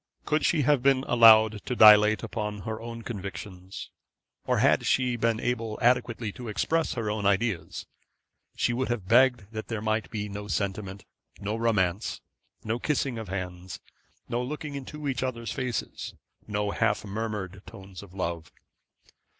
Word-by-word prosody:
Could 155 0 +1
she 155 -4 +2
have 145 -1 +3
been 135 0 +3
allowed 110 -2 +6
to 125 - -1
dilate 105 -1 +7
upon 105 -2 -4
her 110 +3 -5
own 115 0 -7
convictions, 95 -3 -7 0.6
or - - +2
had - - +3
she 125 -2 +2
been 115 -1 0
able 115 -3 -2
adequately 120 -3 +1
to 125 +2 -9
express 160 +9 0
her 110 -4 -2
own 105 -2 -1
ideas, 100 -2 -1 0.7
she 120 - +1
would 130 +2 -1
have 120 -6 -3
begged 120 -3 +4
that 110 -1 -6
there 115 -2 -3
might 110 +1 -1
be 105 -1 -4
no 105 0 -7
sentiment, 100 -1 -3 0.3
no 105 +2 -3
romance, 105 -4 0 0.4
no 115 +2 -2
kissing 135 -4 -1
of 110 - -7
hands, 90 -1 -5 0.5
no 120 - -1
looking 150 +3 -5
into 145 +2 -6
each 130 -3 -1
other's 120 -3 -3
faces, 125 -3 -4 0.3
no 105 -1 -1
half 105 -1 0
murmured 100 -3 -4
tones 95 -1 -10
of 95 -2 -14
love. 85 -3 -4
110 Hz, 155 wpm, -27 LUFS, 100-120 Hz, 0.7 s, dilate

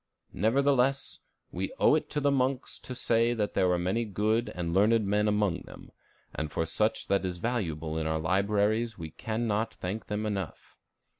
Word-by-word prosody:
Nevertheless, 135 - +2 0.3
we - - -3
owe - - +5
it - - +1
to 150 - -1
the 145 -1 +2
monks 130 -1 0
to 125 - -7
say 115 0 +2
that 105 -2 -1
there 95 -2 +3
were 90 -1 +2
many 95 +7 0
good 110 +2 0
and 85 -2 -2
learned 105 +3 +4
men 105 +2 +2
among 105 -4 +1
them, - - -13 0.4
and 75 -1 -3
for 80 - -1
much 110 +1 +1
that 100 0 +2
is 90 -1 -3
valuable 80 -8 -2
in 80 - -2
our 80 0 0
libraries 105 +7 +1
we 80 -3 -7
can 110 +7 -3
not 110 +1 -1
thank 100 +5 -5
them 105 +1 -2
enough. 100 -5 -4
105 Hz, 180 wpm, -29 LUFS, 90-115 Hz, 0.4 s, owe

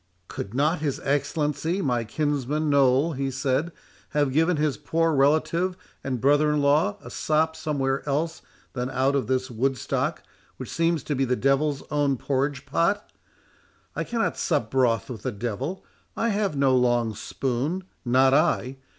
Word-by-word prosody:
"Could 100 +4 -6
not 150 +5 +2
his 145 -3 -2
Excellency, 145 +4 0
my 125 -9 0
kinsman 145 +3 -1
Noll," 140 +3 +3
he 135 0 -2
said, 135 +5 -1 0.5
"have 145 -3 +2
given 165 +3 +3
his 150 -2 +1
poor 165 0 0
relative 160 +6 +2 0.3
and 130 -2 -2
brother 145 +4 +3
in 150 - +1
law 140 -6 +2
a 120 - -9
sop 160 +3 +1
somewhere 135 -3 -1
else 160 +4 -1 0.3
than 125 0 -3
out 135 +1 +1
of 135 -5 0
this 130 0 -1
Woodstock, 130 +1 -1 0.3
which - - -7
seems 165 -3 +1
to 150 - -2
be 135 -1 +1
the 125 -1 +1
devil's 135 +2 +1
own 145 -2 +1
porridge 140 +2 -1
pot? 170 +8 0 0.8
I - - -1
cannot 230 -1 -1
sup 140 -10 0
broth 120 -5 +2
with 120 -4 -7
the 130 - -2
devil; 120 - -4 0.3
I 230 - +1
have 205 -6 0
no 135 -2 +3
long 120 -3 +2
spoon—not 130 - 0
I. 135 -2 +2
140 Hz, 155 wpm, -25 LUFS, 130-155 Hz, 0.8 s, Noll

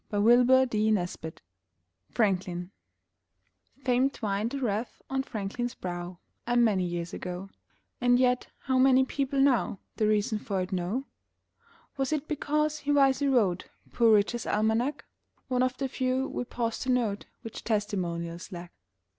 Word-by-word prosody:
FRANKLIN 235 0 +4 2.9
Fame 255 +1 +3
twined 215 -1 -2
a - - -1
wreath 225 -2 -2
on 265 0 +1
Franklin's 240 0 -4
brow 175 0 -5 0.3
A 240 0 +2
many 215 -6 +3
years 175 -1 -3
ago 180 +2 -6 0.5
And 245 0 +4
yet, 250 0 +2
how 260 0 +1
many 265 0 +5
people 275 0 -1
now 265 -7 +3 0.2
The 215 - +2
reason 210 0 +1
for 200 -2 -2
it 185 - -4
know? 190 +9 -2 0.9
Was 270 +1 -1
it 305 -1 -1
because 300 0 0
he 290 - -2
wisely 280 0 +4
wrote 205 -9 +2 0.2
Poor 230 -2 +4
Richard's 215 +3 0
Almanac 220 +6 0 0.4
(One 250 -1 +1
of 255 0 +1
the 270 - -1
few, 260 0 -1
we 245 - -4
pause 230 -2 -3
to 260 - -4
note, 230 -5 0 0.2
Which 225 - -8
testimonials 175 -6 -2
lack)? 175 -1 -8
240 Hz, 135 wpm, -28 LUFS, 200-260 Hz, 2.9 s, many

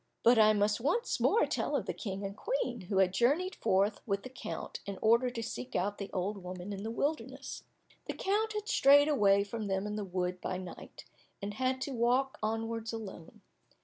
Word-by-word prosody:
But 235 0 +6
I 215 0 +7
must 210 +1 +1
once 295 - 0
more 455 - +4
tell - - -1
of - - 0
the - - -2
King 195 -2 -5
and 195 0 -5
Queen, 445 - -2
who 195 - 0
had 190 -1 +4
journeyed 300 - +2
forth 200 +2 +2
with 200 -1 -1
the 255 - -7
count - - -6
in 200 -1 -4
order 235 +3 +4
to 235 -2 -5
seek 125 - -6
out 200 +3 0
the 200 - -5
old 195 +1 -2
woman 180 +2 -6
in 195 - -5
the 220 - -4
wilderness. 285 +7 -3 0.4
The - - -2
count 430 +3 0
had 420 0 -4
strayed 285 - +6
away 200 -8 +4
from 210 +1 -5
them 190 0 -1
in 210 0 -3
the 210 - -2
wood 180 -1 -2
by 185 - -2
night, 185 -1 -9 0.3
and 205 0 -4
had 260 +3 -1
to 280 - -3
walk 250 +3 +1
onwards 225 +1 -2
alone. 210 -7 -8
215 Hz, 205 wpm, -32 LUFS, 195-255 Hz, 0.4 s, I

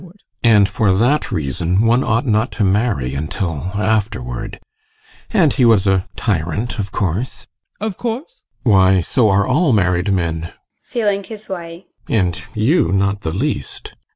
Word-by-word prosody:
And 105 -4 +5
for 100 0 +1
that 125 +9 +1
reason 85 +6 0
one 120 +3 +3
ought 115 +2 0
not 110 0 +1
to 110 - -1
marry 95 - +1
until 80 +3 -3
afterward. 105 - -2 0.7
And - - +3
he - - +1
was 110 -4 +5
a 95 -1 +1
tyrant, 105 +4 -2
of 100 -1 -3
course? 100 +5 -3 0.3
ADOLPH. 215 - -2
Of - - -31
course? 255 - -5 0.2
GUSTAV. 115 - +4
Why, 95 -1 +5
so 110 - +2
are 100 +1 +3
all 140 +2 +2
married 90 -1 +1
men. 85 -3 -2 0.3
[Feeling 205 -5 -1
his 215 +1 -10
way] 170 -1 -7 0.2
And 90 -4 0
you 110 - +2
not 100 +1 +1
the 80 - -3
least. 95 - -3
100 Hz, 155 wpm, -18 LUFS, 90-125 Hz, 0.7 s, And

